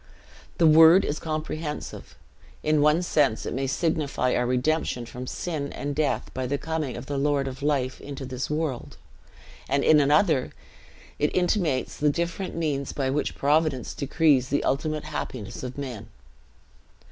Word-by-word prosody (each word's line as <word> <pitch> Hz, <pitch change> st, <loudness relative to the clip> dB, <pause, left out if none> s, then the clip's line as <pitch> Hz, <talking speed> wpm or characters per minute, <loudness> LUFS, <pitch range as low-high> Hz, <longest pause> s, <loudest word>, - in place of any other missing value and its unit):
The 170 Hz, -, +4 dB
word 160 Hz, +4 st, +7 dB
is 145 Hz, -, -2 dB
comprehensive; 155 Hz, -1 st, -5 dB, 0.5 s
in 155 Hz, -1 st, +2 dB
one 150 Hz, +4 st, +4 dB
sense 145 Hz, -9 st, +1 dB
it -, -, -3 dB
may 135 Hz, +1 st, -1 dB
signify 145 Hz, -3 st, 0 dB
our 125 Hz, -, +1 dB
redemption 125 Hz, 0 st, 0 dB
from 125 Hz, +2 st, -8 dB
sin 150 Hz, -3 st, -4 dB
and 145 Hz, 0 st, -4 dB
death 150 Hz, 0 st, -1 dB
by 130 Hz, -1 st, -3 dB
the 140 Hz, +3 st, -1 dB
coming 155 Hz, -4 st, -3 dB
of -, -, -7 dB
the 140 Hz, 0 st, -3 dB
Lord 140 Hz, -1 st, +1 dB
of 130 Hz, 0 st, -7 dB
Life 140 Hz, -3 st, 0 dB
into 140 Hz, -1 st, -7 dB
this 130 Hz, 0 st, -4 dB
world; 150 Hz, -5 st, -3 dB, 0.7 s
and 140 Hz, +1 st, +1 dB
in 155 Hz, -, +6 dB
another, 150 Hz, -1 st, +3 dB, 0.7 s
it 150 Hz, -, +2 dB
intimates 175 Hz, -7 st, 0 dB
the 150 Hz, -, +2 dB
different 170 Hz, +5 st, -3 dB
means 150 Hz, -4 st, -2 dB
b 135 Hz, -2 st, -1 dB
which 150 Hz, +2 st, -1 dB
Providence 145 Hz, -3 st, +1 dB
decrees 140 Hz, -3 st, +2 dB
the 145 Hz, -, 0 dB
ultimate 155 Hz, +2 st, -1 dB
happiness 115 Hz, -2 st, -5 dB
of 125 Hz, +1 st, -6 dB
men. 125 Hz, -7 st, -6 dB
145 Hz, 155 wpm, -26 LUFS, 130-155 Hz, 0.7 s, word